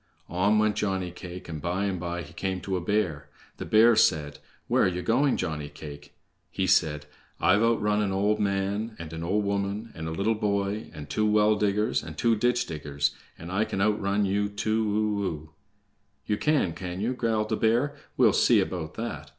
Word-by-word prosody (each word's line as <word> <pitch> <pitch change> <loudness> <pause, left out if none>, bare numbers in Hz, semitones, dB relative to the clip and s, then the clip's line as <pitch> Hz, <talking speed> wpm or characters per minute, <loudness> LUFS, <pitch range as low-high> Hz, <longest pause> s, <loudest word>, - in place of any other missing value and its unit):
On 100 +5 +2
went 105 -1 +2
Johnny 95 -4 -1
cake, 90 +1 -9
and 80 -3 -6
by 90 +5 -1
and 95 -3 -2
by 85 0 -4
he - - -13
came 95 -1 -2
to 95 - -2
a 90 - -1
bear. 85 -7 -1 0.3
The - - -5
bear 115 +2 +6
said: 75 -7 +2 0.3
"Where - - +2
are - - +4
ye 90 0 -2
going, 130 - +2
Johnny 75 -2 -3
cake?" 75 -1 -11 0.3
He - - -1
said: 75 -1 +2 0.3
"I've 100 +3 +4
outrun 105 -2 +2
an 100 -2 0
old 100 +2 +1
man, 100 +2 -1
and 85 -1 -8
an 80 0 -5
old 100 +4 0
woman, 100 +3 -2
and 80 -1 -6
a - - -3
little 100 +7 +1
boy, 100 0 -1
and 75 -1 -9
two 105 0 0
well 105 0 +4
diggers, 105 +1 +1
and 80 -1 -9
two 115 +5 +3
ditch 120 +3 +1
diggers, 75 -2 -2 0.3
and 85 +2 -8
I 100 +3 +2
can 110 -3 -4
outrun 105 0 +1
you 100 +1 0
too 105 0 0
o - - -1
o!" 80 -4 -4 0.8
"Ye 105 - 0
can, 140 - +1
can 90 +1 -6
ye?" 110 +5 0
growled 110 -3 0
the 110 - +1
bear. 120 +7 +1 0.2
"We'll - - +5
see - - +5
about 85 -3 -3
that!" 115 +1 -5
100 Hz, 200 wpm, -27 LUFS, 85-110 Hz, 0.8 s, bear